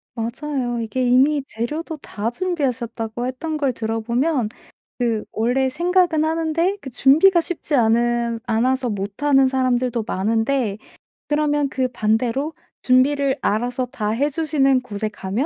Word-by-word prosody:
맞아요. 240 +1 -3
이게 230 +3 -2
이미 270 +4 +4
재료도 300 +9 -4
다 220 -4 -4
준비하셨다고 245 -8 -2
했던 305 +5 -3
걸 280 -3 0
들어 225 -1 -3
보면 245 +2 0 0.5
그 230 -3 0
원래 250 +4 +1
생각은 345 +1 +2
하는데 330 +4 0
그 265 - -8
준비가 315 +9 +5
쉽지 325 -3 -4
않은 235 0 +2
않아서 250 +2 +1
못 200 +4 -5
하는 270 -2 +4
사람들도 255 -3 0
많은데 225 +2 0 0.5
그러면 295 -1 +1
그 260 -1 0
반대로 240 +6 0 0.3
준비를 275 +2 +3
알아서 245 +4 0
다 215 -3 -4
해주시는 275 +1 +1
곳에 215 -3 -4
가면 205 +5 -3
255 Hz, 295 characters per minute, -21 LUFS, 230-295 Hz, 0.5 s, 준비가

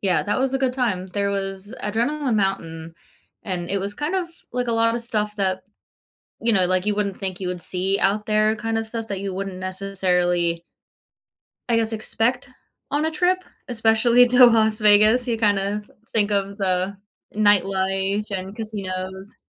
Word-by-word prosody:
Yeah, 190 -3 +1
that 205 +4 -1
was 265 0 +1
a 270 - +1
good 260 -2 0
time. 210 -8 -1
There 200 +2 -1
was 195 0 -3
Adrenaline 240 +4 0
Mountain, 165 -5 -2 0.5
and 180 -3 -4
it 200 - 0
was 200 +1 -3
kind 295 - -3
of, 365 -2 -1 0.2
like 250 -1 -2
a 235 - +1
lot 230 0 +2
of 235 - -2
stuff 210 -3 -2
that, 190 -2 -1 0.8
you 235 - +2
know, 190 -3 +3
like, 185 +1 0
you 210 -1 +1
wouldn't 200 -2 -2
think 190 -1 -4
you 185 - -4
would 180 -1 -3
see 190 +3 +2
out 210 +2 +1
there 215 0 +2
kind 225 +1 -2
of 225 0 -3
stuff 225 0 -5
that 200 -3 -4
you 195 -1 -4
wouldn't 195 0 -5
necessarily 180 -3 0 1.1
I 230 - +4
guess, 225 0 +1
expect 225 +2 0 0.4
on 295 +2 0
a 320 - +1
trip, 360 +4 +1 0.2
especially 235 +1 +4
to 250 0 +8
Las 220 -2 +3
Vegas. 215 +4 +5
You, 235 - +1
kind 205 -3 +2
of, 205 +2 -3 0.2
think 210 -2 +2
of 200 -1 -1
the 190 0 -1 0.4
nightlife 195 -1 +2
and 190 +1 -5
casinos. 190 -2 -5
205 Hz, 180 wpm, -22 LUFS, 190-225 Hz, 1.1 s, to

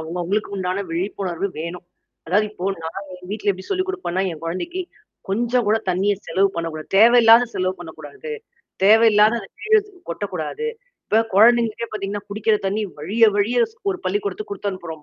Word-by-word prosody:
அவங்க 160 +2 -6
அவங்களுக்கு 200 +3 -2
உண்டான 185 +1 -2
விழிப்புணர்வு 180 +1 -2
வேணும். 170 +2 -6 0.4
அதாவது 205 +6 +2
இப்போ 195 -2 -3
நான் 195 +5 -6
என் 180 0 -13
வீட்ல 210 -1 0
எப்டி 185 0 -10
சொல்லிக் 375 -1 0
குடுப்பேன்னா, 365 - -2
என் 160 -2 -9
குழந்தைக்கு 330 - -3 0.5
கொஞ்சம் 235 +3 +1
கூட 215 - +4
தண்ணீிய 190 +3 +2
செலவு 190 +4 +2
பண்ணக்கூடாது. 165 -2 -4
தேவையில்லாத 230 +2 +7
செலவு 185 0 0
பண்ணக்கூடாது. 400 - -9 0.5
தேவையில்லாத 215 +1 +6
அந்த 195 - -11
கீழ 440 0 +4 0.3
கொட்டக்கூடாது. 185 - -4 0.4
இப்ப 220 - +3
குழந்தைங்களுக்கே 230 +1 +4
பார்த்தீங்கன்னா, 205 -1 -4
குடிக்கிற 215 +1 +1
தண்ணீ 205 +3 -1 0.2
வழிய 205 +9 +3
வழிய 220 +4 +1
ஸ் 450 - -25
ஒரு 370 - -3
பள்ளிக்கூடத்துக்கு 415 +1 -2
குடுத்து 205 - -3
அனுப்புறோம் 165 -5 -8
205 Hz, 155 wpm, -21 LUFS, 180-230 Hz, 0.5 s, தேவையில்லாத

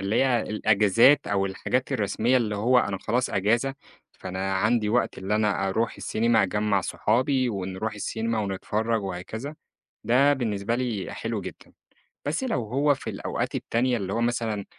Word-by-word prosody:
اللي 100 +3 -1
هي 120 -3 +2
الأجازات 110 +5 +4
أو 100 -1 +1
الحاجات 125 +6 -2
الرسمية 110 +5 +1
اللي 105 -4 0
هو 125 +4 +3
أنا 100 -5 -1
خلاص 125 +5 -1
اجازة، 115 +8 +1 0.4
فأنا 95 +1 -4
عندي 110 +2 +2
وقت - - 0
اللي 95 +2 -2
أنا 105 -2 +1
أروح 115 +4 -1
السينيما 115 -1 +1
أجمَّع 105 0 +1
صحابي 130 +7 +1
ونروح 100 +1 -3
السينما 110 +2 -2
ونتفرج 105 +2 -1
وهكذا، 110 +10 -6 0.5
ده 140 +4 +4
بالنسبة 115 -4 -1
لي 120 -6 -2
حلو - - -3
جدًا، - - -10 0.5
بس 155 - -1
لو 225 - -1
هو 140 +6 +2
في - - -7
الأوقات - - -3
التانية 120 +1 0
اللي 95 -1 -4
هو 115 - -1
مثلًا 115 -4 -1
110 Hz, 155 wpm, -26 LUFS, 100-120 Hz, 0.5 s, الأجازات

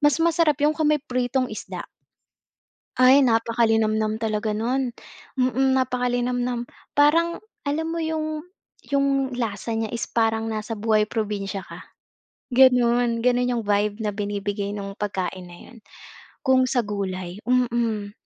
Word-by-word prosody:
mas 295 -1 +4
masarap 330 -3 +3
yun 300 +1 +4
kung 310 -1 0
may 300 -2 +2
pritong 255 -2 -1
isda. 215 - -6 1.2
Ay 265 +2 +7
napaka 230 -1 +2
linamnam 220 -1 +1
talaga 215 -1 -1
nun. 245 +4 -1 0.5
Mm. 260 +1 +2
Napaka 250 -1 0
linamnam. 245 0 -1 0.2
Parang 330 +4 +3 0.2
alam 305 +3 -1
mo 330 - -3
yung 310 -1 -3 0.5
yung 275 -1 +1
lasa 225 -1 -3
niya 225 - -1
is 230 - -2
parang 225 -1 +1
nasa 220 +1 -3
buhay 215 0 +2
probinsya 205 -3 -3
ka, - - -11 0.7
ganun, 245 -2 +4
ganun 250 +1 +2
yung 235 - 0
vibe 205 0 0
na 215 - -1
binibigay 205 0 -3
nung 200 -1 -6
pagkain 190 -3 -3
na 175 - -12 0.2
yun, 245 - -15 0.7
kung 260 0 +4
sa 250 -2 +1
gulay, 190 -3 -4
mm 235 -4 +1
235 Hz, 140 wpm, -24 LUFS, 210-260 Hz, 1.2 s, Ay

